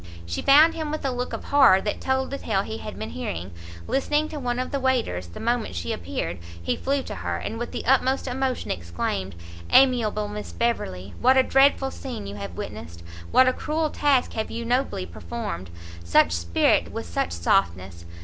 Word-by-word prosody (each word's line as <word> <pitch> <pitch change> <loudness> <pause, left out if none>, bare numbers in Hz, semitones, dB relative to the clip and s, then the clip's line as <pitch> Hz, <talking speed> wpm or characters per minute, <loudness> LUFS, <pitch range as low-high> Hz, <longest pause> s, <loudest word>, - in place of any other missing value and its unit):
She 85 0 -3
found 305 +4 +7
him 315 -2 -4
with 305 -1 -4
a 270 - +1
look 250 0 -3
of - - -5
horror 270 -9 +6
that 210 - -3
told 265 0 0
the 275 - -4
tale 195 -3 0
he 220 +2 -6
had 215 - -7
been - - -5
hearing, 85 +2 -5 0.3
listening 295 +3 0
to 305 - -5
one 245 -2 -2
of 255 - -3
the 280 - -1
waiters; 245 - 0
the 85 - -10
moment 235 - -1
she 85 -2 -2
appeared, 85 -1 -4 0.2
he 85 - -1
flew 275 0 -1
to - - -6
her, - - -3
and 225 - -5
with 240 - -4
the - - -5
utmost 265 +1 +2
emotion 260 0 -2
exclaimed, 85 +2 -3 0.3
"Amiable 230 -6 +4
Miss 210 0 -7
Beverley! 95 - -2
what 260 +2 +5
a 260 - +6
dreadful 270 0 +3
scene 255 - -7
have 100 -1 -5
you 85 - -13
witnessed! 85 +2 -7 0.3
what 255 0 +5
a 255 - +3
cruel 310 +2 -1
task 275 -4 +2
have 220 -1 -3
you 235 +1 -5
nobly 245 - 0
performed! 85 +1 -6 0.3
such 85 -1 +4
spirit 85 0 +2
with - - -5
such 85 0 -2
softness! 85 0 0
230 Hz, 195 wpm, -25 LUFS, -, 0.3 s, found